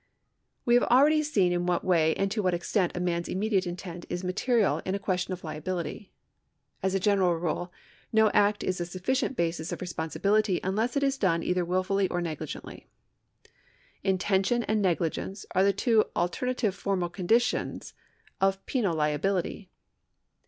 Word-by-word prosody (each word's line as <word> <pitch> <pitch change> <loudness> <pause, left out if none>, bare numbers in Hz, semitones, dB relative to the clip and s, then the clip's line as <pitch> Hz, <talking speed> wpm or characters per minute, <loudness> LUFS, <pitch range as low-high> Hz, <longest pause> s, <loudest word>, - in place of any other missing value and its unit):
We 240 - +3
have 245 - +5
already 290 +6 +5
seen 210 -12 +2
in 175 0 -1
what 175 -1 0
way 160 -3 +3
and 195 0 -1
to 215 - 0
what 185 -3 +1
extent 175 +1 0
a - - -1
man's 170 -1 -1
immediate 195 -1 0
intent 175 -1 -7
is 175 +1 -3
material 215 +4 +1
in 190 - -2
a - - 0
question 185 -1 -2
of 185 0 -5
liability. 175 +5 -5 0.7
As 190 0 0
a - - +2
general 190 -3 +3
rule 175 +1 -3 0.4
no 220 -1 +4
act 205 0 +2
is 185 -1 -1
a - - -1
sufficient 240 +8 -1
basis 165 -1 -1
of - - -4
responsibility 185 +3 0
unless 220 +7 0
it 280 - +1
is 275 -1 +1
done 170 -4 +1
either 180 0 0
wilfully 185 +2 +1
or 175 - -1
negligently. 155 -3 -6 1.1
Intention 195 +4 +1
and 215 -1 0
negligence 185 +1 -1
are 190 - +4
the 200 - +4
two 220 +2 +2
alternative 220 +4 0
formal 195 -2 -1
conditions 225 +7 0 0.5
of 195 0 +1
penal 205 -10 0
liability. 165 +5 -1
190 Hz, 160 wpm, -28 LUFS, 175-210 Hz, 1.1 s, have